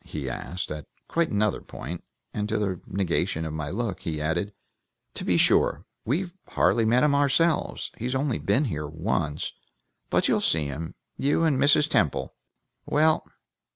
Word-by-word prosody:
he 75 -3 -5
asked, 85 +9 -4
at 75 -2 -6 0.2
quite 170 0 +1
another 105 0 +1
point, 85 +3 -7 0.3
and 105 0 -2
to 110 - +1
the 95 -4 -1
negation 90 -3 0
of 80 - -4
my 75 -2 -3
look 100 0 -2
he 80 -3 -3
added, 85 +6 -1 0.6
"To - - -4
be - - +2
sure! - - +3 0.2
We've 175 - -1
hardly 115 - +3
met 120 +4 +4
him 150 -1 +4
ourselves; 145 +4 +2
he's 125 +3 -3
only 135 -2 0
been 145 +4 +2
here 75 - -3
once; 80 -1 -2 0.6
but - - +3
you'll - - +2
see 80 -2 +2
him 75 +3 -5 0.2
you 145 +4 +2
and 150 -5 +3
Mrs. 145 +1 +5
Temple. 80 - +1 0.5
Well!" 155 +1 +3
105 Hz, 160 wpm, -26 LUFS, -, 0.6 s, Mrs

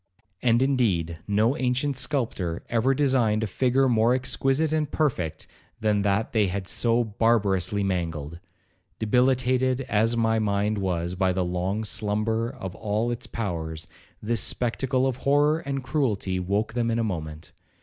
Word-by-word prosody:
And, 120 0 +3
indeed, 95 - 0
no 110 +5 +2
ancient 130 +2 0
sculptor 120 - -2
ever 120 +4 +2
designed 125 -6 +2
a - - +1
figure 130 +6 +2
more 115 0 +3
exquisite 135 +4 0
and 155 -2 0
perfect 120 - -1 0.3
than 105 -2 +1
that 100 +3 0
they 105 -3 +3
had 95 +1 -4
so 120 +3 +2
barbarously 105 -3 +1
mangled. 85 -4 -3 0.6
Debilitated 130 +2 +2
as 115 -1 +1
my 115 -1 +2
mind 105 0 0
was 90 -2 -1
by 95 0 +1
the 90 0 0
long 90 +4 -2
slumber 110 +2 0
of 110 -9 -7
all 110 +3 -1
its 120 - -5
powers, 85 -6 -4 0.4
this 115 0 +1
spectacle 130 +3 0
of 130 -2 -1
horror 145 +3 +2
and 140 -4 -4
cruelty 105 -10 -1
woke 100 +5 -1
them 120 -1 0
in 115 - 0
a 115 - +1
moment. 80 -6 -5
110 Hz, 150 wpm, -25 LUFS, 95-125 Hz, 0.6 s, And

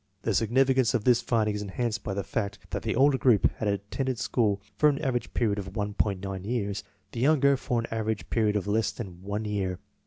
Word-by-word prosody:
The 110 - 0
significance 130 +3 +3
of 115 - 0
this 120 0 +4
finding 110 -3 +1
is 105 - -3
enhanced 110 +2 -2
by 95 - -3
the 100 - -2
fact 100 +1 -3
that - - -2
the - - -1
older 135 +1 +4
group 120 -6 +4
had 110 - -2
attended 105 +6 -2
school 105 -4 +1 0.2
for 150 - +5
an 140 - 0
av 130 - +1
erage 120 - -2
period 105 -3 +1
of 95 -1 -7
1.9 100 -2 -2
years, 105 -2 -2 0.3
the 115 - -5
younger 140 +1 +4
for 125 -2 -1
an 115 - -2
average 110 -5 -2
period 110 -2 +2
of 100 - 0
less 105 0 +1
than 95 -7 -8
one 100 +3 -3
year. 95 -3 -2
110 Hz, 215 wpm, -27 LUFS, 100-125 Hz, 0.3 s, for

